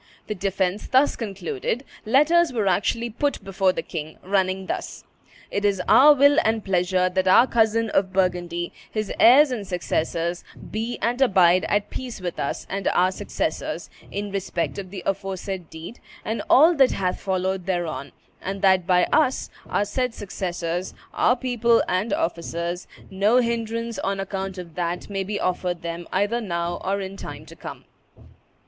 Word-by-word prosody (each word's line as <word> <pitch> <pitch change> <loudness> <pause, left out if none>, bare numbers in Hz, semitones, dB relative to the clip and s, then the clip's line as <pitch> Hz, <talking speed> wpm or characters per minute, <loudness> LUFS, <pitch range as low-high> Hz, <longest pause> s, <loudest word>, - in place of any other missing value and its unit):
The - - -3
defence 195 0 -1
thus 265 +3 +3
concluded, 200 - -4 0.2
letters 310 +7 +4
were 225 -5 -1
actually 230 +5 0
put 280 +1 -1
before 195 -1 +1
the - - -4
king, 155 -2 -6
running 190 0 0
thus: - - -5 0.5
"It 200 - -1
is 200 -2 +2
our 295 +2 +8
will 285 +2 +5
and 220 -1 0
pleasure 185 -1 +2
that 185 +1 0
our 190 +6 +7
cousin 225 -2 +2
of 190 -1 +1
Burgundy, 175 -2 -1 0.2
his 215 -2 -3
heirs 270 +4 +7
and 215 -6 -4
successors, 170 -1 -2 0.3
be 225 +3 -3
and 245 +3 0
abide 185 -7 +5
at 205 0 0
peace 250 -4 -6
with 180 -2 -5
us 140 - -3
and 195 0 -3
our 185 +1 +3
successors, - - -4 0.2
in 205 0 -4
respect 195 -2 -2
of 190 -2 -7
the 185 -2 -7
aforesaid 190 -2 -3
deed, 165 +8 -9 0.3
and 220 - -2
all 315 +6 +7
that 265 -2 +5
hath 185 -2 -2
followed 190 -1 -1
thereon; 170 -6 -2 0.3
and 195 +1 -5
that 190 -2 +4
by 180 -1 +4
us, 265 -4 +2 0.2
our 205 - +1
said 250 +3 -2
successors, 180 -3 -4 0.2
our 245 - +3
people 240 -2 +2
and 185 +5 0
officers, 170 0 -2 0.2
no 200 +5 +3
hinderance, 230 -2 -2
on 195 0 -2
account 195 0 -4
of 175 -3 -8
that, 175 +3 -3
may 195 -1 -1
be 205 +1 -3
offered 180 -1 -2
them, 170 0 -5
either 205 +5 0
now 170 -4 -3
or 200 +1 -1
in 190 0 -6
time - - -8
to - - -13
come." - - -9
195 Hz, 165 wpm, -24 LUFS, 180-225 Hz, 0.5 s, our